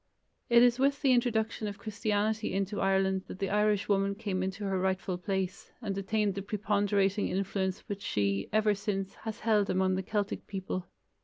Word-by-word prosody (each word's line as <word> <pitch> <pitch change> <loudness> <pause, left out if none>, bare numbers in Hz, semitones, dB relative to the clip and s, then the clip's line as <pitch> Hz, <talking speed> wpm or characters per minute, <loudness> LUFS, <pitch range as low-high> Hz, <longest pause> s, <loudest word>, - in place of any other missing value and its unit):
It 235 0 +7
is 245 0 +4
with 280 +2 +2
the 270 - +5
introduction 230 -3 +1
of 205 -1 -5
Christianity 215 +1 -1
into 195 +1 -1
Ireland 190 0 +2
that - - -7
the 195 0 -2
Irish 210 -1 +2
woman 200 -1 +2
came 200 -4 -2
into 190 +2 -3
her 195 -2 0
rightful 185 -1 -1
place, 190 0 -3
and 205 -5 -3
attained 200 +1 0
the 195 - -4
preponderating 200 -1 +1
influence 190 0 -1
which 200 -1 -6
she, 100 - 0
ever 215 0 +3
since, 195 -1 -3
has 220 0 -7
held 210 -3 +2
among 185 0 +2
the 190 - 0
Celtic 205 +1 -2
people. 190 -2 -4
200 Hz, 175 wpm, -30 LUFS, 190-215 Hz, -, It